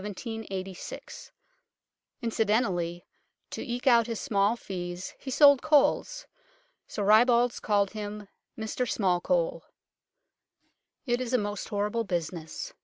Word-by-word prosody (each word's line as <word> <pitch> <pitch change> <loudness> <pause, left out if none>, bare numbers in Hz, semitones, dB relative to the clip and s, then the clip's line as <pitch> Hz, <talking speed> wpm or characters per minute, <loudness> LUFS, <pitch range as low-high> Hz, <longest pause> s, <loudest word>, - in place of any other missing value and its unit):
Incident 210 - -7 1.4
ally, 175 -3 -2 0.5
to - - -5
eke 245 -2 -4
out 235 -3 +5
his 230 -2 -3
small 205 -3 +1
fees, 180 -4 -6
he 270 - -7
sold 285 0 +6
coals. 310 - +2 0.6
So 205 - -4
ribalds 235 +3 +4
called 200 -2 +1
him 210 -1 -6
" - - -56
Mr 225 +3 -2
Smallcole." 220 - +1 1.4
It 245 -1 0
is 255 0 -3
a - - +5
most 205 -2 -4
horrible 210 +2 -1
business. 175 - -4
220 Hz, 110 wpm, -28 LUFS, 195-250 Hz, 1.4 s, sold